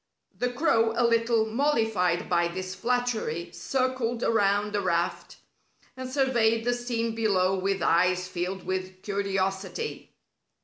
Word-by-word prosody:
The 250 0 -1
crow, 230 -5 +2
a 240 - +3
little 230 -1 +2
mollified 220 - +1
by 170 -1 +2
this 185 +2 -5
flattery, 230 -8 -1
circled 255 +1 -1
around 205 -1 +2
the 205 - +1
raft, 170 -2 -1 0.6
and 255 0 -6
surveyed 235 -4 +2
the 245 - +2
scene 235 -2 -2
below 195 -4 +2
with 195 -1 -1
eyes 180 +2 +2
filled 185 +1 -4
with 185 0 -4
curiosity. 195 - -3
215 Hz, 125 wpm, -27 LUFS, 185-240 Hz, 0.6 s, a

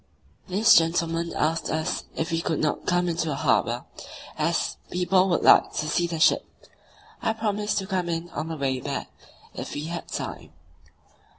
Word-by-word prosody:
This 210 +4 +5
gentleman 165 0 +2
asked 160 +2 0
us 160 0 -2
if 160 +2 -2
we 165 0 0
could 160 - -1
not 155 -1 -1
come 175 0 +2
into 165 -1 -1
the 150 - -1
harbour, - - +1 0.5
as - - 0
"people 185 +1 +2
would 170 - +1
like - - +6
to 155 - -2
see 170 +3 +1
the 165 -1 -4
ship." - - +4 0.8
I 220 - +1
promised 210 -1 -1
to 195 - -1
come 185 -3 -2
in 165 0 -2
on 155 +2 -4
the 165 -1 -5
way 135 -2 -1
back, - - -4 0.4
"if - - -6
we 145 - -3
had 170 0 -5
time." - - -6
170 Hz, 175 wpm, -25 LUFS, 160-180 Hz, 0.8 s, like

